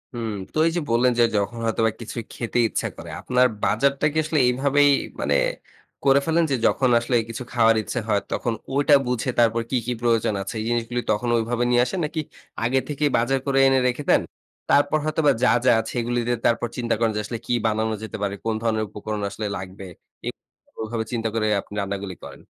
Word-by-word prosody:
হুম। 115 -2 -3 0.2
তো - - -4
এই - - +1
যে, - - 0
বললেন 120 +2 +3
যে, 120 - +7
যখন 110 +4 -1
হয়তোবা 115 0 +1
কিছু 115 - -7 0.2
খেতে 120 0 -3
ইচ্ছা - - -2
করে। - - -9
আপনার 125 0 +3 0.2
বাজারটা 140 +6 +2
কি - - -3
আসলে 155 -1 0
এভাবেই 140 +3 +3 0.3
মানে - - +1 0.7
করে 140 0 +5
ফেলেন 165 +1 +2
যে, - - +3
যখন 130 -2 +2
আসলে 120 +1 -1
কিছু 115 +2 -5
খাওয়ার 115 -2 +4
ইচ্ছা 120 - -3
হয়, 100 -1 +2
তখন 120 - -1 0.2
ওটা 145 +1 +5
বুঝে 125 +1 -1
তারপর 115 0 +3
কি, - - +1
কি 125 - 0
প্রয়োজন 115 -3 +2
আছে। 95 - -5
এই - - -4
জিনিসগুলো 120 +1 -1
তখন 120 +3 0
ঐভাবে 120 +2 0
নিয়ে 120 0 +4
আসেন, 190 - -3
নাকি 160 +1 -4 0.4
আগে 130 +3 +2
থেকেই 145 0 0
বাজার 130 +3 +1
করে 135 -1 0
এনে 135 0 +4
রেখে 125 +4 -2
দেন? - - +5 0.5
তারপর 145 +2 +4
হয়তোবা 155 -2 +2
যা, - - +5 0.2
যা - - +6
আছে 110 - -7
এগুলো 120 +1 -2
দিয়ে 120 -1 +1
তারপর 120 0 +1
চিন্তা 120 -1 0
করেন 115 -1 +2
যে, - - 0
আসলে 115 +1 -4
কি - - -1
বানানো 110 0 0
যেতে 110 - -6
পারে, 100 0 -1
কোন 110 -1 0
ধরনের 110 -1 +1
উপকরণ 105 0 -5
আসলে 105 +2 -4
লাগবে? 95 +1 -8 0.4
এ - - +1 0.5
ওভাবে 110 0 -3
চিন্তা 115 -2 -1
করে 110 -1 0 0.2
আপনি - - -15
রান্না 100 0 -3
গুলি 95 -3 -6
করেন? - - -11
120 Hz, 210 wpm, -23 LUFS, 110-135 Hz, 0.7 s, যে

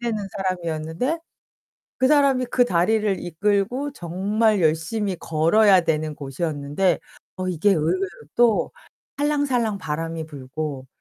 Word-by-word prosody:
잘 235 -1 -1
안 - - -2
되는 205 -2 -3
사람이었는데 180 - -2 0.8
그 260 - +3
사람이 275 -4 +4
그 245 0 +3
다리를 200 +1 +1
이끌고 205 - 0
정말 205 +2 0
열심히 175 +5 0
걸어야 180 +5 +4
되는 155 -1 -1
곳이었는데 145 +4 -1 0.4
어 185 0 -3
이게 180 +4 +2
의외로 185 +3 +1 0.3
또 235 -2 +3 0.5
살랑살랑 270 -8 +1
바람이 165 0 -4
불고 140 -1 -6
185 Hz, 285 characters per minute, -23 LUFS, 160-220 Hz, 0.8 s, 사람이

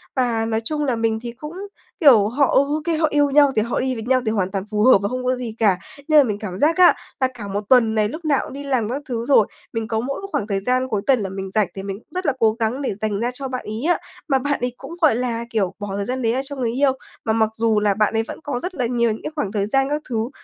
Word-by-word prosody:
Và, 235 -3 +1
nói 225 0 -1
chung 300 +1 -1
là, 255 -4 +1
mình 225 -1 0
thì 235 - -4
cũng, 300 +7 -9 0.5
kiểu, 240 - +6
họ, 275 +5 +2
ừ, - - +7
ô 290 +2 0
kê, 330 -2 0
họ 315 0 +3
yêu 290 -1 +3
nhau 285 0 +5
thì 215 - +3
họ 235 +2 -1
đi 260 0 -1
với 225 - -5
nhau 255 +1 +2
thì 220 - +1
hoàn 190 -3 -1
toàn 195 -1 -2
phù 210 0 +1
hợp 255 -1 +7
và 200 - -1
không 255 0 -3
có 255 0 +2
gì 240 -3 -6
cả, 205 -5 +3 0.3
nhưng 310 -1 +6
mà - - +7
mình 210 -5 -2
cảm 190 -2 -6
giác 320 +4 +3
á, 360 -1 +7 0.3
là 260 - +3
cả 220 -5 -8
1 200 +1 -2
tuần 230 -4 +5
này 210 -1 +2
lúc 315 +5 -8
nào 290 -3 +2
cũng - - -9
đi 280 - -7
làm 255 -6 0
các 270 +4 -3
thứ 235 -1 -2
rồi, 255 -7 +5 0.3
mình 225 -1 -2
có 220 -1 -1
mỗi 275 +9 -3
một 395 - -6
khoảng 205 - -1
thời 195 -2 -1
gian 255 +5 0
cuối 210 -5 -1
tuần 265 -3 +4
là 195 -2 -3
mình 195 0 -5
rảnh 215 -3 +2
thì 195 - -6
mình 195 +1 -5
rất 365 0 -4
là 285 - +2
cố 220 -1 +4
gắng 230 +5 -1
để 260 - -1
dành 210 -2 -1
ra 240 +2 -1
cho 270 +2 -5
bạn 255 -1 -5
ấy 215 +3 -5
á, - - -2 0.3
mà 270 -2 +2
bạn 285 +2 -1
ấy 245 0 -1
cũng, - - -10
gọi 305 -8 +5
là, 235 -1 -2
kiểu, 200 -5 0
bỏ 205 - -5
thời 200 - -2
gian 255 +2 -3
đấy 225 -1 +1
ra 260 - 0
cho 285 - -7
người 245 -4 -1
yêu, 270 +2 +3 0.3
mà 220 - +1
mặc 220 -1 +2
dù 225 -1 +2
là 205 -1 +2
bạn 215 +1 +1
ấy 225 0 +1
vẫn - - -7
có 275 -4 -3
rất 360 +4 -5
là 255 -5 -1
nhiều 235 -1 +1
những 215 - -6
cái - - -4
khoảng 210 -11 -2
thời 205 -2 0
gian 270 +5 +1
các 295 +1 -1
thứ. 225 0 -1
235 Hz, 315 wpm, -21 LUFS, 215-275 Hz, 0.5 s, ừ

